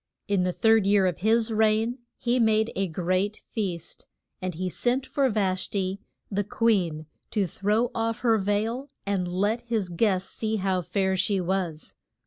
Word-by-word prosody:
In 200 -3 +2
the 180 0 +1
third 220 +1 +3
year 200 -1 +4
of 180 -2 0
his 225 +3 +2
reign 220 +3 +2 0.2
he 245 +1 +1
made 220 -1 +3
a 195 0 0
great 185 +5 0
feast. 185 -7 -4 0.3
And 185 -2 -3
he 185 +3 -2
sent 245 +8 0
for 275 -1 +1
Vash 190 -4 0
ti, 195 -1 -2 0.3
the 205 +1 0
queen, 190 -8 +1 0.2
to 205 -3 +1
throw 215 +5 0
off 225 0 -1
her 225 -3 +3
veil 220 +7 -1 0.2
and 195 -3 0
let 205 +6 0
his 225 -6 -2
guests 190 +1 0
see 220 0 -1
how 190 -2 0
fair 190 +1 0
she 195 +1 +1
was. 180 -3 -2
205 Hz, 165 wpm, -26 LUFS, 185-225 Hz, 0.3 s, year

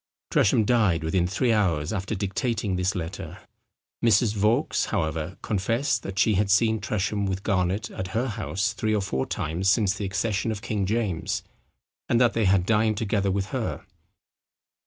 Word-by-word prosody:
Tresham 110 - +3
died 105 -9 +2
within 85 +2 +1
three 115 +6 +1
hours 90 -5 +1
after 100 +1 -2
dictating 100 +1 -1
this 90 +2 0
letter. 90 +1 -5 0.7
Mrs. 115 -1 +4
Vaux, 110 +8 +1
however, 80 -2 -2
confessed 115 +6 0
that 95 0 -7
she 110 +1 +4
had 100 +1 +1
seen 110 +2 +3
Tresham 100 0 -1
with 95 0 -3
Garnet 95 +2 0
at 95 - -5
her 125 +2 0
house 105 0 -2
three 110 -1 0
or 105 - +1
four 65 -8 -2
times 85 +5 -1
since 105 -2 +3
the 100 +1 -4
accession 100 +3 -1
of 105 -1 -5
King 100 -3 -1
James, 105 -6 -1 0.7
and 120 - +3
that 120 -2 +4
they 115 -2 +1
had 95 -1 +3
dined 110 0 +2
together 100 -2 0
with 95 +1 -1
her. 125 -4 -3
100 Hz, 165 wpm, -25 LUFS, 95-110 Hz, 0.7 s, Mrs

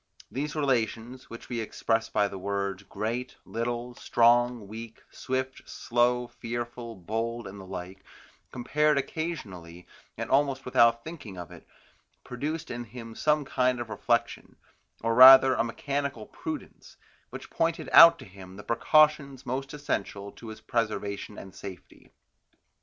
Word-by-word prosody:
These 150 +4 -4
relations, 125 -3 -1
which 115 - -10
we 120 -2 -3
express 115 +1 -1
by 105 -1 +2
the 95 -1 -8
words, 100 0 -3
great, 115 +5 -4
little, 120 +1 -3
strong, 120 -2 +2
weak, 115 +2 -9
swift, 130 0 -4
slow, 125 +1 +1
fearful, 120 0 -6
bold, 115 +5 -4
and 95 +1 -9
the 95 - -12
like, 95 +1 -8 0.5
compared 150 +4 +1
occasionally, 100 - -5 0.3
and - - -5
almost 135 -1 +2
without 115 -1 +4
thinking 150 - -9
of 85 - -8
it, - - -14 0.6
produced 150 +6 -5
in 120 0 -5
him 115 +1 -10
some 150 +3 +1
kind 125 -1 +1
of 120 -2 -6
reflection, 120 -1 -1 0.5
or 115 0 +1
rather 130 +2 +10
a 115 - +1
mechanical 135 0 -3
prudence, 320 -4 -8 0.3
which - - -10
pointed 165 0 -1
out 170 0 +10
to - - -12
him 95 -1 -13
the 105 - -10
precautions 140 +1 +2
most 135 +2 -3
essential 100 -8 -4
to 115 - -13
his 110 -1 -9
preservation 105 -3 -3
and 95 - -10
safety. 95 -3 -11
120 Hz, 140 wpm, -28 LUFS, 110-135 Hz, 0.6 s, rather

